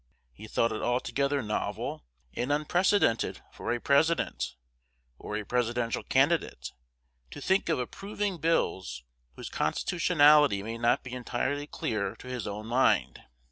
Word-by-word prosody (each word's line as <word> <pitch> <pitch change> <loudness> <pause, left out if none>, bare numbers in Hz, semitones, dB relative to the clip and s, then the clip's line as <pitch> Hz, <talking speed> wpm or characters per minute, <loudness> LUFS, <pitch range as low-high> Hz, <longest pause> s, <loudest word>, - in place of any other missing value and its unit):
He 110 - -11
thought 115 +2 +1
it 110 - -3
altogether 140 +3 0
novel 105 - -3 0.3
and 125 +4 -2
unprecedented 155 - +2
for - - -4
a 120 - 0
President, 160 +6 +1 0.6
or 105 - -4
a 105 - -5
Presidential 120 0 0
candidate, - - +1 0.6
to - - -9
think 190 +5 +1
of 160 - +2
approving 195 - -3
bills 95 - 0 0.3
whose - - -7
constitutionality 150 - +3
may 115 +2 -5
not 120 0 +2
be 125 - -8
entirely 130 +3 -2
clear 105 -7 -2
to - - -13
his 125 -3 -4
own 105 +1 -5
mind. 115 - +2
125 Hz, 135 wpm, -29 LUFS, 110-150 Hz, 0.6 s, constitutionality